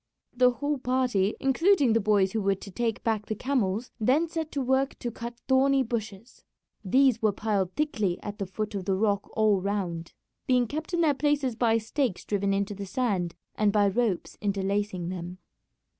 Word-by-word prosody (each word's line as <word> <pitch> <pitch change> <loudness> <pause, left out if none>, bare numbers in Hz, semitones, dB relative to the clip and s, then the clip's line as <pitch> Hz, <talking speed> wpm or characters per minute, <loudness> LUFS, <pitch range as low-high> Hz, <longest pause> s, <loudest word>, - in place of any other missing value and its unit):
The 250 0 +5
whole 285 +3 -2
party, 250 -6 +1
including 275 - +3
the 225 - +3
boys 200 -2 +2
who 220 - -1
were 195 0 +2
to 195 +1 -11
take 230 +2 -2
back 220 -2 -1
the 215 - -2
camels, 235 -3 -1
then 270 +9 +3
set 320 -1 -4
to 285 - -1
work 265 +2 +1
to 240 - -4
cut 235 +1 -7
thorny 270 +1 +4
bushes. 225 -2 -6 0.4
These 255 +3 +3
were 215 -2 +3
piled 200 -3 -1
thickly 215 -12 0
at 205 0 -6
the 195 - -3
foot 210 +3 -4
of 195 -2 -4
the 195 -1 +1
rock 200 0 0
all 215 -3 +3
round, 180 -4 -3 0.3
being 250 -1 +3
kept 315 +7 -4
in 340 - +1
their 310 -3 +4
places 285 -3 0
by 230 -1 +3
stakes 225 -1 -2
driven 200 -1 0
into 200 +1 0
the 200 0 -7
sand 190 -6 -1 0.2
and 210 -1 +2
by 205 -1 +3
ropes 210 -3 -1
interlacing 200 -2 -1
them. 180 0 -6
220 Hz, 185 wpm, -27 LUFS, 195-260 Hz, 0.4 s, The